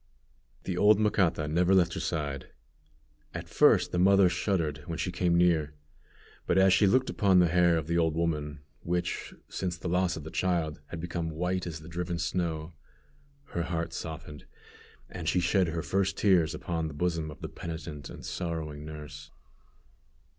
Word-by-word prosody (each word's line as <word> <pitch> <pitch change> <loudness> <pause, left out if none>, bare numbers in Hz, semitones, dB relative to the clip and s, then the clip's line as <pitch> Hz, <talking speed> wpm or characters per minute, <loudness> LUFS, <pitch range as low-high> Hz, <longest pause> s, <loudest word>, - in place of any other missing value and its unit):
The 90 -2 -3
old 105 0 +6
Macata 95 -8 +2
never 90 +5 +3
left 85 -3 +3
her - - -3
side. 70 -5 -3 0.9
At - - -5
first - - +4
the 90 - 0
mother 95 0 +6
shuddered 85 -5 -1
when 80 - -4
she 90 +2 -2
came 90 -1 +1
near; 80 -4 +2 0.7
but 85 - +2
as 95 -1 +6
she 100 +1 +5
looked 130 +6 +2
upon 95 -3 +3
the 90 -1 +6
hair 85 -1 +4
of 80 - -2
the 85 +2 +1
old 80 -1 +1
woman, 75 -3 -2 0.2
which, 90 +1 -3
since 90 -2 -3
the 85 - -6
loss 90 0 +1
of 80 - -7
the 80 - -8
child, 85 -5 -1
had 85 - -7
become 85 -1 -3
white 90 +3 -2
as 80 -2 -6
the 80 - -12
driven 85 +1 -3
snow, 85 -2 -2 0.8
her 85 - -2
heart 85 -1 -3
softened, 75 -2 -7 0.6
and - - -4
she 90 - +2
shed 90 +1 +2
her 80 0 -3
first 100 0 0
tears 90 -6 +3
upon 80 -3 -3
the 75 - -7
bosom 80 -1 -1
of 75 - -11
the - - -4
penitent 80 -3 -7
and - - -10
sorrowing 80 -4 -4
nurse. 75 -1 -9
85 Hz, 175 wpm, -29 LUFS, 80-90 Hz, 0.9 s, old